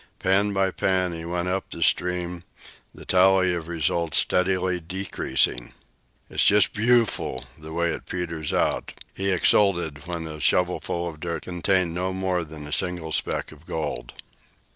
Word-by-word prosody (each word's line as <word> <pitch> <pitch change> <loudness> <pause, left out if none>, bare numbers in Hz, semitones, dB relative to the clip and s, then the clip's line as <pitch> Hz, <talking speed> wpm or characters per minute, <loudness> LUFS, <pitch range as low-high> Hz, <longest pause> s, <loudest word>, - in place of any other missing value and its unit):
Pan 100 +2 +2
by 95 -1 +1
pan, 95 -2 0
he 80 0 -6
went 85 +1 -2
up 95 +1 -2
the 85 - -3
stream, 90 0 0 0.5
the - - -12
tally 95 0 +4
of 85 -2 -4
results 85 0 0
steadily 90 0 +2
decreasing. 85 -8 -1 0.5
"It's - - 0
just 100 -3 +4
booful, 115 - +1
the 80 +1 -10
way 85 +1 0
it - - -8
peters 85 -4 -3
out," - - 0 0.2
he 95 0 -1
exulted 85 -5 +2
when 85 -2 -4
a 80 -1 -7
shovelful 90 +1 0
of 80 -2 -8
dirt 85 +1 -4
contained 90 0 +1
no 90 +2 -2
more 95 -2 -1
than 75 -2 -9
a 75 - -8
single 90 -2 +1
speck - - -1
of 80 +1 -16
gold. 75 -6 -4
90 Hz, 155 wpm, -25 LUFS, 80-95 Hz, 0.5 s, tally